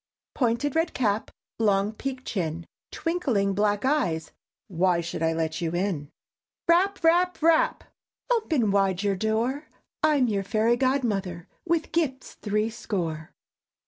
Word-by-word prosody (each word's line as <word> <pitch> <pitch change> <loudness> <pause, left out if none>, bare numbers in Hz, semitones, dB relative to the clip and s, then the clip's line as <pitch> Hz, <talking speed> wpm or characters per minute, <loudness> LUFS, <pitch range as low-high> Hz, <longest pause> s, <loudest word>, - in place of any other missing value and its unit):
_ - - -68
"Pointed 250 +3 0
red 325 +1 +1
cap, 215 -3 0 0.3
Long 205 -1 +2
peakèd 260 +3 -5
chin, 165 -4 -3 0.3
Twinkling 260 - 0
black 205 +2 +1
eyes, 255 - 0 0.4
Why 180 -1 +2
should 165 -1 -4
I 160 0 +2
let 160 +1 -2
you 165 0 -1
in?" 175 -6 -2 0.6
_Rap! 375 +3 +3
Rap! 355 +2 +3
Rap! 330 +10 +3 0.5
"Open 315 - +2
wide 195 -1 +1
your 200 -1 +1
door, 230 +8 -1 0.3
I'm 290 -5 +3
your 205 -3 0
Fairy 220 +4 +2
Godmother, 215 -10 -1 0.2
With 335 -2 0
gifts 275 -6 -1
threescore!" 205 -7 -3
220 Hz, 130 wpm, -26 LUFS, 190-285 Hz, 0.6 s, Rap